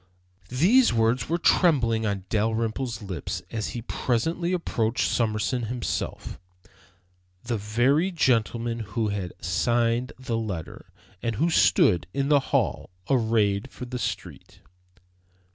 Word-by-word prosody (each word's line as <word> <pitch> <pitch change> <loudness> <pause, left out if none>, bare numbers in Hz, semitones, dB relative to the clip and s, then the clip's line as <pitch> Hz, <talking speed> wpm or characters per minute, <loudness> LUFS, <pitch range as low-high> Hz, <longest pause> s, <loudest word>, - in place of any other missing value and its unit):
These 195 - +4
words 115 +2 +1
were 170 - +1
trembling 125 - +3
on 100 -2 -3
Dalrymple's 110 +1 -1
lips 90 -2 -5
as 110 -3 -2
he 115 - -5
presently 160 +10 -1
approached 125 -10 0
Summerson 115 +2 0
himself, 120 0 -4 1.0
the 120 -1 -2
very 125 - +2
gentleman 120 - 0
who 110 +1 -2
had 100 -3 -4
signed 115 +6 +1
the 125 -3 -3
letter, 100 -8 -6 0.3
and 115 -1 -2
who 165 +10 +1
stood 95 - +4
in 140 0 0
the 145 -1 +6
hall, - - 0 0.2
arrayed 110 -2 +2
for 125 - -8
the 125 0 -5
street. - - -6
115 Hz, 120 wpm, -26 LUFS, 110-130 Hz, 1.0 s, the